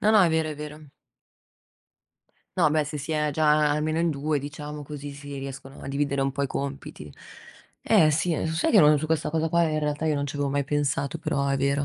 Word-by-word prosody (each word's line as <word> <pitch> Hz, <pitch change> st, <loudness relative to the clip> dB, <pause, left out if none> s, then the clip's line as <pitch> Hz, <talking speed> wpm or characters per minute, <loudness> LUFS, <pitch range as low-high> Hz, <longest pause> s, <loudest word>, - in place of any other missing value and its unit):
No, 215 Hz, -, +3 dB
no, 210 Hz, -, +7 dB
è 175 Hz, -, +5 dB
vero, 160 Hz, -1 st, +1 dB
è 150 Hz, -, -5 dB
vero. 150 Hz, 0 st, -9 dB, 1.7 s
No, 150 Hz, -, +4 dB
beh, 155 Hz, -1 st, +2 dB
se 150 Hz, +1 st, -5 dB
si 145 Hz, +3 st, -4 dB
è 150 Hz, -1 st, +1 dB
già 150 Hz, 0 st, +3 dB
almeno 155 Hz, +2 st, 0 dB
in 170 Hz, 0 st, +2 dB
2 150 Hz, 0 st, -1 dB
diciamo 150 Hz, +1 st, -7 dB
così, 145 Hz, 0 st, -7 dB
si 140 Hz, 0 st, -8 dB
riescono 135 Hz, 0 st, -8 dB
a -, -, -6 dB
dividere 140 Hz, 0 st, 0 dB
un 135 Hz, 0 st, 0 dB
po' 140 Hz, -, -4 dB
i -, -, +1 dB
compiti. 135 Hz, -, -6 dB, 0.7 s
Eh 155 Hz, -1 st, +5 dB
sì, 165 Hz, +3 st, +1 dB
ehm, 160 Hz, -, -1 dB
so 160 Hz, -, -2 dB
sai 165 Hz, -, +1 dB
che 205 Hz, -, +7 dB
non 150 Hz, -1 st, +6 dB
su 155 Hz, -, -4 dB
questa 160 Hz, -1 st, 0 dB
cosa 160 Hz, +1 st, -1 dB
qua 170 Hz, +1 st, +3 dB
in 155 Hz, -1 st, 0 dB
realtà 150 Hz, +1 st, -1 dB
io 155 Hz, -, +2 dB
non 140 Hz, 0 st, -1 dB
ci 145 Hz, -, -6 dB
avevo 145 Hz, -1 st, 0 dB
mai 140 Hz, 0 st, 0 dB
pensato, 145 Hz, +1 st, -1 dB
però 150 Hz, -4 st, -1 dB
è 140 Hz, 0 st, +1 dB
vero. 140 Hz, +1 st, +1 dB
150 Hz, 240 wpm, -26 LUFS, 140-155 Hz, 1.7 s, no